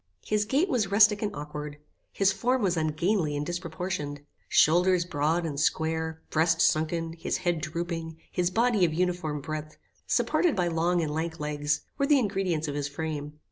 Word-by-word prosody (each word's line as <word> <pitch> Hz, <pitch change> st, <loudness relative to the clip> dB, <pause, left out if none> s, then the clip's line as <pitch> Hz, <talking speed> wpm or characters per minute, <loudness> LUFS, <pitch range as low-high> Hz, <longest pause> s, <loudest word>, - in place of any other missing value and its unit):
His 210 Hz, 0 st, +1 dB
gait 275 Hz, -, +2 dB
was 240 Hz, -, 0 dB
rustic 205 Hz, 0 st, +5 dB
and 210 Hz, -1 st, -1 dB
aukward. 150 Hz, 0 st, -6 dB, 0.3 s
His 195 Hz, 0 st, +3 dB
form 240 Hz, +5 st, 0 dB
was 180 Hz, -3 st, +2 dB
ungainly 155 Hz, 0 st, 0 dB
and 145 Hz, -, -2 dB
disproportioned. 170 Hz, -4 st, -4 dB, 0.3 s
Shoulders 175 Hz, +2 st, +4 dB
broad 165 Hz, +1 st, 0 dB
and 145 Hz, -3 st, -3 dB
square, 160 Hz, +1 st, -1 dB
breast 160 Hz, +1 st, +2 dB
sunken, 165 Hz, 0 st, +1 dB
his 165 Hz, -, -2 dB
head 175 Hz, -3 st, -1 dB
drooping, 165 Hz, 0 st, -4 dB
his 180 Hz, -1 st, +1 dB
body 225 Hz, 0 st, +2 dB
of 160 Hz, -3 st, +2 dB
uniform 175 Hz, -4 st, -1 dB
breadth, 155 Hz, +1 st, -6 dB, 0.3 s
supported 350 Hz, -5 st, +2 dB
by 180 Hz, -2 st, +1 dB
long 170 Hz, +1 st, +1 dB
and 150 Hz, -1 st, -2 dB
lank 160 Hz, +1 st, -3 dB
legs, 150 Hz, 0 st, -1 dB, 0.2 s
were 280 Hz, -, +2 dB
the 295 Hz, -1 st, +5 dB
ingredients 190 Hz, -, 0 dB
of 145 Hz, -, -3 dB
his 145 Hz, -1 st, -2 dB
frame. 150 Hz, 0 st, -4 dB
165 Hz, 170 wpm, -28 LUFS, 155-190 Hz, 0.3 s, rustic